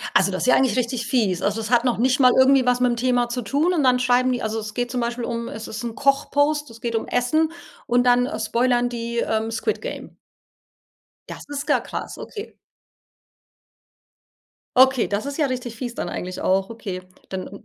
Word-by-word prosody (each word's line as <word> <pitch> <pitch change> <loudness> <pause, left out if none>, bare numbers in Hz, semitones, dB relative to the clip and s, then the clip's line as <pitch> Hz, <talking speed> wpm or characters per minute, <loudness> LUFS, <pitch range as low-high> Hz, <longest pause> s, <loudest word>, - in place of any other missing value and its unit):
Also, 190 +1 +4
das 185 - -3
ist - - 0
ja 250 - +6
eigentlich 265 -1 +2
richtig 240 -1 -1
fies. 215 -9 +1
Also, 205 +2 0
es 220 0 -5
hat 240 -1 +4
noch 245 -4 +1
nicht 255 +3 +2
mal 250 -1 +7
irgendwie 265 0 +5
was 250 0 +2
mit 250 -1 +3
'm - - -2
Thema 245 0 +1
zu 245 +1 -3
tun 290 - +1
und 315 - +1
dann 255 -2 +4
schreiben 250 +1 +2
die 245 - -2
also, 220 0 -2
es 215 -1 -6
geht 245 +1 -2
zum 250 0 -2
Beispiel 235 0 -2
um 235 0 -3
es 220 -2 -7
ist 215 -1 -6
'n 230 -1 -4
Koch-Post, 285 +2 +1
es 230 0 -13
geht 230 -1 -2
um 225 - -2
Essen 310 +6 +1 0.3
und 245 +1 +2
dann, 245 0 +4
äh, 300 - -5
spoilern 240 +2 +1
die, 235 0 -4
ähm, 220 -1 0
„Squid-Game“? 435 - -3 1.2
Das - - -8
ist 290 +1 -5
ja - - +4
krass, - - -6
okay. 420 0 -8 2.2
Okay, 260 -1 +5
das 205 +5 -2
ist 280 +1 -5
ja 300 - +3
richtig 250 -3 -4
fies 240 0 -5
dann - - -4
eigentlich 180 +1 -5
auch, 190 +2 +1
okay, 200 -5 -6 0.3
dann 190 +2 -7
245 Hz, 205 wpm, -22 LUFS, 225-255 Hz, 2.2 s, mal